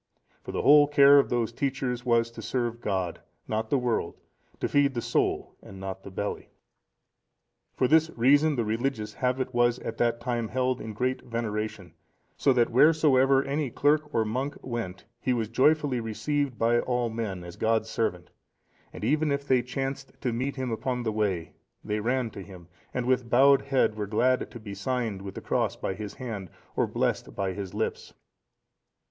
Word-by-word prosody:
For - - -7
the - - -2
whole 145 0 +7
care 140 -1 +7
of - - +1
those 120 -2 0
teachers 130 -2 -2
was 115 -1 +2
to - - -9
serve 120 -2 -2
God, 95 -6 -2 0.3
not 110 0 -2
the 140 - +3
world—to 120 -8 -4
feed 140 -2 +2
the - - 0
soul, - - 0
and 95 - -12
not 95 0 -6
the - - -10
belly. 100 +2 -4 1.3
For 130 - +2
this 160 +3 +4
reason 145 +5 +4
the 120 -3 0
religious 110 -1 -2
habit 130 0 -1
was 120 0 +3
at 115 -2 -6
that 120 0 +1
time 120 -2 -2
held 130 +1 -1
in 110 0 -6
great 125 +4 -1
veneration; 110 -6 -4 0.4
so 140 - +3
that 120 -2 +2
wheresoever 135 -1 +5
any 140 0 -1
clerk 150 +4 +1
or 115 -5 +1
monk 130 +7 -3
went, 115 -7 -5
he 130 - 0
was 115 -3 -1
joyfully 140 +1 +2
received 130 +4 -2
by 115 +2 +3
all 120 -2 -1
men, 105 -6 -4
as 85 0 -9
God's 110 0 0
servant; 90 -7 -2 0.6
and - - -9
even 150 0 +2
if 140 0 -2
they 130 -2 +4
chanced 135 +2 -4
to 125 -3 -1
meet 130 +4 -2
him 130 -3 -3
upon 125 +3 -2
the 110 - -1
way, 100 -6 -1 0.3
they 105 0 -2
ran 120 +1 0
to 100 - -8
him, 90 -3 -12 0.2
and 125 - -2
with 125 -2 +1
bowed 135 +3 +6
head, 135 -5 +1
were 105 -1 -4
glad 125 +5 +1
to 120 - -10
be 105 -2 -8
signed 110 -1 -2
with 95 -1 -8
the - - -6
cross - - 0
by - - -3
his 105 0 -7
hand, 110 -8 -6 0.3
or - - +2
blessed - - -2
by 95 -1 -1
his 100 0 -6
lips. 110 - -3
120 Hz, 180 wpm, -27 LUFS, 110-135 Hz, 1.3 s, whole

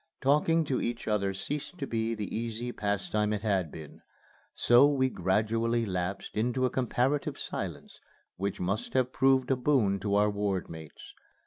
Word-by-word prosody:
Talking 150 +4 +3
to 135 -3 -1
each 120 0 -3
other 100 -2 +1
ceased 145 - -5
to 140 - -3
be 115 -2 -1
the 105 -2 -5
easy 115 +1 -3
pastime 105 0 -1
it 105 -1 -3
had 95 -7 0
been; 80 -2 -10 0.5
so 120 +4 +6
we 135 -3 +2
gradually 115 +5 +1
lapsed 95 0 -3
into 125 +4 +1
a 125 - 0
comparative 130 +3 0
silence - - -6 0.4
which 100 +1 -3
must 100 +5 -2
have 130 0 +2
proved 135 -1 +3
a - - +4
boon 125 -7 +2
to 100 +1 0
our 105 +1 +3
ward 100 -3 -2
mates. 80 -3 -11
115 Hz, 160 wpm, -29 LUFS, 100-130 Hz, 0.5 s, so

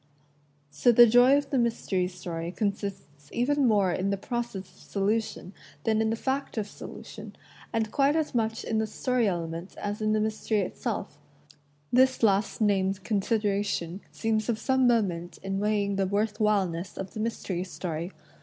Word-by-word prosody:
So 150 +12 +4
the 240 +1 +9
joy 245 +4 +6
of 290 - -3
the 270 - +2
mystery 205 -6 0
story 175 -2 -5
consists 195 -9 -4
even 275 +3 +2
more 200 -5 +3
in 185 +2 -1
the 200 - 0
process 240 +2 -3
of - - -21
solution 205 -1 -2 0.3
than 220 0 +2
in 220 - +1
the 225 - +1
fact 265 +2 -2
of 215 - 0
solution - - -10 0.2
— - - -21
and 220 -1 -1
quite 280 +1 +3
as 315 -2 0
much 225 -2 0
in 220 - 0
the 220 - 0
story 250 +1 0
element 170 -1 -3
as 205 +1 -4
in 215 0 +2
the 215 - +2
mystery 215 0 0
itself. 185 - -4 0.7
This 260 0 +4
last 200 +1 +2
named 195 -2 +1
consideration 205 -4 0
seems 220 0 -1
of 230 - +1
some 260 +2 +2
moment 185 -8 0
in 195 0 -2
weighing 205 -1 +1
the 195 -1 +1
worth 205 +2 0
whileness 195 -5 0
of 195 -1 -6
the - - -6
mystery 210 -5 -2
story. 175 -2 -4
210 Hz, 170 wpm, -28 LUFS, 190-230 Hz, 0.7 s, the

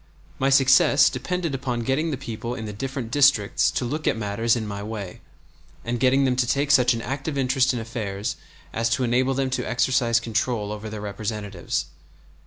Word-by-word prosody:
My 135 - +2
success 135 +1 +5
depended 165 +5 -3
upon 125 -3 -2
getting 135 +7 0
the 145 - -2
people 120 -1 -5
in 110 - -6
the 105 - -6
different 130 +1 -5
districts 135 -6 +3
to 125 - -2
look 150 +5 -3
at - - +2
matters 110 +2 0
in 115 -2 -3
my 100 -1 -5
way, 100 -3 -6 0.6
and 120 +1 -2
getting 135 +2 +3
them 130 -1 +2
to 125 -1 +2
take 140 +3 +1
such 125 -3 +5
an 115 - -5
active 140 +3 -4
interest 130 0 +2
in 125 - -3
affairs 110 -3 -4 0.4
as 115 +1 0
to 120 +3 0
enable 125 +2 +1
them 135 -1 -1
to 130 - -2
exercise 125 -1 +2
control 115 -2 -2
over 105 +1 -6
their 105 -1 -6
representatives. 105 -2 -4
120 Hz, 190 wpm, -24 LUFS, 110-135 Hz, 0.6 s, success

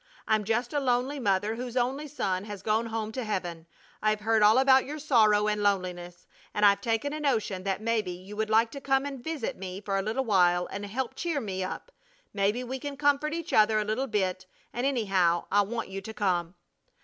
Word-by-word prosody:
I'm 215 -1 +2
just 235 +4 -1
a 290 - +2
lonely 260 +2 0
mother 205 -2 +1
whose 245 +1 -5
only 265 +5 0
son 195 -9 -2
has 205 -3 -8
gone 220 +2 +1
home 220 -1 -3
to 255 +3 -4
heaven. 175 -6 -4 0.3
I've 215 0 +1
heard 220 0 +2
all 210 +3 +6
about 265 0 +6
your 295 +3 -6
sorrow 215 -8 +3
and 210 0 0
loneliness, 180 -3 -2 0.3
and 210 - +3
I've 200 -1 +5
taken 235 +4 -1
a 305 - -4
notion 220 -10 0
that 195 +1 -1
maybe 225 -4 0
you 185 +3 -8
would 220 0 -2
like 225 +1 +3
to 280 - -8
come 270 0 +1
and 275 -3 -6
visit 320 -7 -3
me 185 0 -6
for 200 -1 -3
a 195 - +1
little 225 +7 -2
while 180 -4 +3
and 205 +1 -5
help 240 +4 -3
cheer 330 -4 -2
me 190 -6 -3
up. 190 - -6 0.4
Maybe 205 +5 0
we 260 +2 -5
can 285 0 -6
comfort 290 +2 +1
each 335 -1 -5
other 215 0 +5
a 215 - 0
little 220 +6 -1
bit, 185 -4 -1 0.3
and, 245 +3 0
anyhow, 195 -10 +1
I 205 - +5
want 230 +1 -3
you 195 0 -5
to 220 +3 -8
come. 180 -3 0
215 Hz, 215 wpm, -28 LUFS, 195-260 Hz, 0.4 s, all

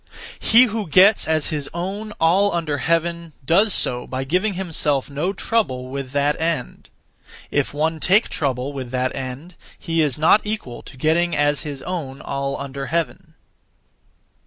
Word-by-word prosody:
He 235 +3 +6
who 220 -4 -2
gets 195 +7 +5
as 155 -1 +1
his 150 -3 -3
own 200 +5 -4
all 190 +5 +3
under 155 -4 -1
heaven 170 0 -1
does 195 +9 +4
so 125 -8 0
by 130 0 -3
giving 180 +8 0
himself 150 -7 -1
no 150 +7 -1
trouble 145 - -1
(with 135 0 -5
that 145 +3 0
end). 165 -6 -3 0.6
If 145 -2 0
one 160 +2 -1
take 195 +8 +3
trouble 135 -1 -2
(with 130 -3 -6
that 130 +1 -1
end), 135 +7 -6 0.2
he 165 0 -1
is 145 -5 +1
not 160 +7 +5
equal 210 - -5
to 135 - -13
getting 165 +4 +1
as 145 -1 +2
his 145 -3 -7
own 155 -7 -5
all 140 0 -3
under 140 0 -5
heaven. 165 0 -3
155 Hz, 160 wpm, -21 LUFS, 140-180 Hz, 0.6 s, He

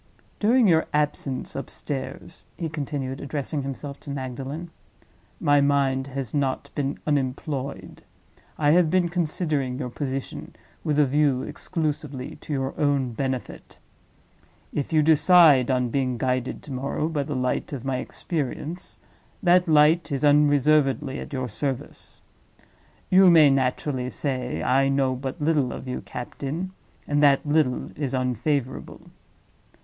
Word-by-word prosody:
During 230 +2 +4
your 160 -3 +3
absence 145 -3 -1
upstairs," 135 +1 -6
he 165 - -3
continued, 140 -3 -4
addressing 145 +1 -3
himself 140 +1 -6
to - - -11
Magdalen, 140 +5 -5 0.7
"my 145 0 +4
mind 140 -2 +1
has 135 -3 -5
not 140 -1 -1
been 140 -1 -2
unemployed. 140 -1 -3 0.6
I 145 -1 +3
have 170 0 +4
been 175 0 +2
considering 155 -6 -1
your 125 -3 -4
position 135 0 -5 0.3
with 150 -2 0
a 150 - +5
view 140 -1 +2
exclusively 150 -6 -4
to - - -10
your 135 -1 -1
own 140 -4 +1
benefit. 130 +1 -5 1.0
If 145 +1 -2
you 155 -1 +4
decide 155 -4 +6
on 125 -2 +1
being 130 -2 0
guided 130 0 -2
to 150 - -10
morrow 135 +4 -2
by 160 -3 -1
the 145 0 -4
light 125 0 -1
of 135 -3 -6
my 135 -1 0
experience, 155 +4 -4 0.5
that 180 0 +4
light 155 +2 +4
is 140 +1 0
unreservedly 145 -1 +3
at - - -8
your 130 -3 -2
service. 130 +3 -5 0.9
You 185 0 +7
may 155 -4 +7
naturally 130 0 0
say: 130 -3 -3
'I 135 +1 +3
know 135 -1 +2
but 130 +4 -5
little 145 -4 +1
of 130 - -7
you, 125 - -4
captain, 140 +8 -5 0.4
and 145 0 +1
that 140 -1 +4
little 145 -4 +1
is 140 -3 -2
unfavorable. 130 +2 -2
140 Hz, 135 wpm, -25 LUFS, 130-150 Hz, 1.0 s, You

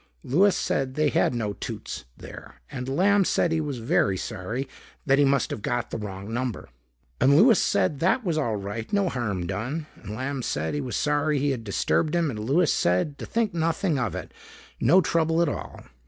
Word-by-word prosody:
Louis 190 +9 +3
said 130 -1 -1
they 150 -1 +2
had 125 - +1
no 105 -3 -2
Toots - - -6
there - - -11 0.2
and 125 +1 -5
Lamb 195 +8 +3
said 175 -1 +1
he 160 -1 +1
was 145 -4 -3
very 105 -4 +1
sorry, 115 +7 -4 0.4
that 135 0 +3
he - - +6
must 135 -2 +1
have - - -4
got 120 +2 -2
the - - -3
wrong 100 +1 -6
number. 120 - -3 0.5
And 140 +3 +5
Louis 225 +3 +6
said 100 +9 +1
that 190 - +2
was 170 -3 0
all 130 -8 0
right, 105 +3 -5
no 200 -3 +2
harm 105 - -2
done. 125 - -3 0.2
And 105 0 -7
Lamb 130 +3 -3
said 80 -8 -2
he 145 - -1
was 130 -3 -4
sorry 150 0 +1
he 140 +1 +1
had 125 -4 -3
disturbed 150 - 0
him 165 -4 +1
and 110 - -6
Louis 145 +10 +2
said 90 - 0
to - - -6
think 225 -3 0
nothing 165 -1 0
of 120 -5 -2
it, - - -7 0.5
no 175 +10 +5
trouble 165 -1 +1
at 170 - +3
all. - - -6
135 Hz, 200 wpm, -25 LUFS, 110-160 Hz, 0.5 s, he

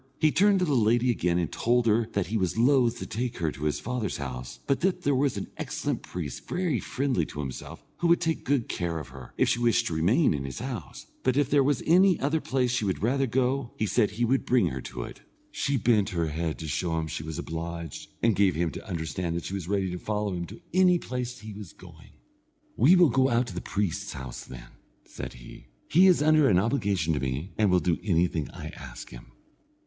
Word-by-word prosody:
He 155 -1 +3
turned 200 +3 +4
to 180 - +2
the 150 - 0
lady 120 +1 +3
again 90 -6 0
and 85 -3 -1
told 120 +1 +1
her 110 0 +3
that 100 -3 0
he 110 - -4
was 95 -1 0
loth 120 -1 +4
to - - -6
take 120 +2 -3
her 80 -3 0
to 75 - -6
his 75 - 0
father's 120 -4 -3
house, 60 -3 -6
but 140 - +1
that 190 0 0
there 145 - +2
was 135 -4 +1
an 100 - -5
excellent - - -3
priest 85 -6 -6
very 175 -7 0
friendly 130 -10 -1
to 75 - -8
himself, 65 -3 -6
who 175 - 0
would 170 0 +5
take 165 -2 -1
good 135 -4 +1
care 85 -2 -2
of 75 -5 -7
her, 65 0 -12
if - - +3
she 120 - +1
wished 120 0 +2
to 100 - -2
remain 95 - +3
in 70 -2 -3
his 70 -1 -6
house; 115 - -6 0.2
but 130 -1 +1
that - - +3
if 145 -1 0
there 140 -1 +5
was 140 -1 +1
any 180 +2 +5
other 150 +3 0
place 130 -2 0
she 125 -2 0
would 95 -1 -2
rather 135 +4 +2
go, 130 +1 0
he 110 - 0
said 105 +2 +2
he 115 +4 -1
would 130 +3 +1
bring 125 -2 +3
her 65 0 -5
to 60 -1 -6
it. - - -10 0.3
She 140 0 0
bent 110 -4 +2
her 85 -2 +1
head, 80 +1 -2
to 80 - -6
show 80 +2 -1
him 80 - -1
she 75 - -5
was 80 0 -6
obliged, 85 -1 -6
and 115 -2 +4
gave 100 -2 +3
him 85 0 0
to - - -9
understand 85 0 -3
that 85 - -4
she - - -5
was 95 -4 -4
ready 100 -2 0
to 90 - -5
follow 105 -1 -2
him 85 -1 -3
to 105 - -12
any 180 -1 +5
place 125 -5 -4
he 110 0 -9
was 100 -4 -9
going. - - -15 0.7
"We 145 - +6
will 175 -4 +6
go 130 -1 +3
to 115 - -8
the 90 - -4
priest's 100 0 -2
house, 65 -4 -7
then," - - -11 0.4
said - - -7
he; - - -13 0.2
"he 180 +5 +6
is 180 -5 +4
under 155 -2 +5
an 90 - +4
obligation 100 - +1
to 75 - -1
me, 70 +7 -3
and 105 -2 +2
will 90 0 +4
do 85 -2 0
anything 85 -5 +1
I - - -8
ask - - -10
him." - - -12
105 Hz, 235 wpm, -27 LUFS, 85-130 Hz, 0.7 s, We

